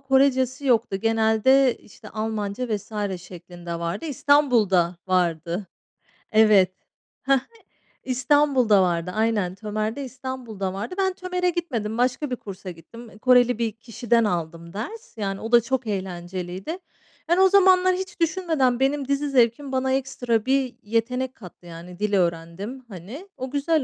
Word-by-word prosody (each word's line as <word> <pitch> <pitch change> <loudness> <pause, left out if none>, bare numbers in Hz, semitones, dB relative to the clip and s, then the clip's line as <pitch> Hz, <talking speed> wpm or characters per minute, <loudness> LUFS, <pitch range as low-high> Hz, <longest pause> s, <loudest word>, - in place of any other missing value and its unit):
Korecesi 265 0 +2
yoktu 230 -5 +2
genelde, 225 +5 +3
işte, - - -15
Almanca 215 +1 -3
vs. 205 -2 -4
şeklinde 175 -1 -8
vardı, 170 - -3
İstanbul'da 240 - +3
vardı. 175 +1 0 0.7
Evet, 215 -4 +5 0.5
ha 275 - +3
ha, 260 - 0 0.6
İstanbul'da 260 -4 +3
vardı. 175 -1 0
Aynen, 215 -5 0
Tömer'de 215 +5 -3
İstanbul'da 250 -7 -5
vardı. 215 - -5
Ben 380 -1 +1
Tömer'e 365 -1 -1
gitmedim, 245 -12 -3
başka 255 +3 0
bir 250 - 0
kursa 195 -4 -8
gittim. 225 +8 -13
Eee, 210 - -16
Koreli 245 0 +4
bir 230 -2 -1
kişiden 230 +1 0
aldım 170 -3 -3
ders, 415 - -7
yani, 195 -2 -3
o 225 - -5
da 240 - +7
çok 240 +1 -2
eğlenceliydi. 185 - -4 0.5
Yani 350 +2 +4
o 380 - +6
zamanlar 370 -1 +5
hiç 375 0 -6
düşünmeden 320 -8 +1
benim 275 0 +1
dizi 280 +1 0
zevkim 255 +2 +2
bana 260 0 0
ekstra 250 -4 -1
bir 265 -2 +1
yetenek 250 +4 -1
kattı. 180 -3 -14
Yani 175 +1 -10
dil 210 0 -1
öğrendim, 185 +7 -2
hani, 215 - -9
o 260 0 -5
güzel 300 +1 +1
230 Hz, 140 wpm, -24 LUFS, 195-270 Hz, 0.7 s, da